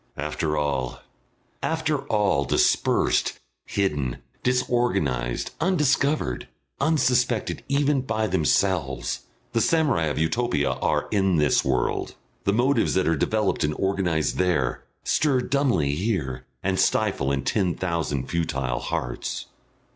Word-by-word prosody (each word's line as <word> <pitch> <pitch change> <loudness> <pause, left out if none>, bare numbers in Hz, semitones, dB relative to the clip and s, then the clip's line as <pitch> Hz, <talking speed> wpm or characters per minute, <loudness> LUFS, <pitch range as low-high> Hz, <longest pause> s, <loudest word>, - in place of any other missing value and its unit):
After 75 +1 -2
all, 70 -4 -1 0.6
after 160 -2 0
all, 100 -9 +2
dispersed, - - +2 0.3
hidden, 75 -11 -1 0.2
disorganised, 120 - 0
undiscovered, 150 - +1 0.3
unsuspected 125 -7 +1
even 140 0 +2
by 110 -4 -1
themselves, 80 - +1 0.3
the 115 - +2
samurai 150 - +2
of 75 - -2
Utopia 80 -2 +1
are - - 0
in 95 -3 +2
this 75 -2 +3
world, 65 -2 -1 0.3
the 100 - +3
motives 120 +3 +2
that 95 -3 +2
are 80 - +3
developed 105 +6 0
and 75 0 0
organised 95 -5 0
there 85 -9 +1 0.2
stir 140 -4 +2
dumbly 125 - +1
here 80 - -2 0.2
and 95 0 0
stifle 95 -11 +1
in 70 -2 -1
ten 95 -1 +1
thousand 85 -7 -2
futile 70 -7 -1
hearts.... - - -3
95 Hz, 115 wpm, -25 LUFS, 75-125 Hz, 0.6 s, this